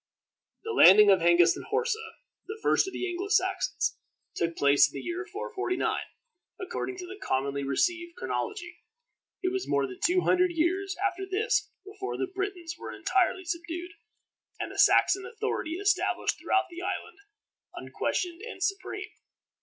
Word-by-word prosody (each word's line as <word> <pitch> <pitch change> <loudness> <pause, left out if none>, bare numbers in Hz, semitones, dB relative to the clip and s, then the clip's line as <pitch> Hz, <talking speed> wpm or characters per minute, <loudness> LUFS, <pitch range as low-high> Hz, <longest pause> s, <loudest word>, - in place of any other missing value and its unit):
The 450 - -4
landing 205 - +8
of 190 - +5
Hengist 170 0 +5
and - - -8
Horsa, 450 -2 -2 0.3
the 430 - -6
first - - +3
of - - -4
the 370 - -3
Anglo 360 +2 -3
Saxons, 380 -2 0 0.4
took 170 0 -2
place 140 0 +5
in - - -16
the - - -6
year 355 +1 -4
449, 400 -3 -2 0.6
according 375 -1 -4
to 365 - -6
the 385 +3 -10
commonly 140 +1 -1
received 340 - 0
chronology. 360 -4 -4 0.7
It 370 - +1
was 385 -1 -2
more 140 -1 +2
than 130 -1 -9
two 365 +1 +3
hundred 360 -1 +3
years 375 +4 0
after 385 -1 -1
this 430 +2 +1 0.2
before 395 -1 -5
the - - 0
Britons 375 -3 -5
were - - -7
entirely 375 0 0
subdued, 345 +1 -4 0.7
and - - -4
the - - -7
Saxon 390 - +5
authority 435 -7 -3
established 400 +1 0
throughout 380 - +1
the 345 +1 -7
island, 370 +1 -4 0.6
unquestioned 355 0 -3
and 440 -5 -6
supreme. 390 +2 -3
365 Hz, 155 wpm, -28 LUFS, 335-390 Hz, 0.7 s, landing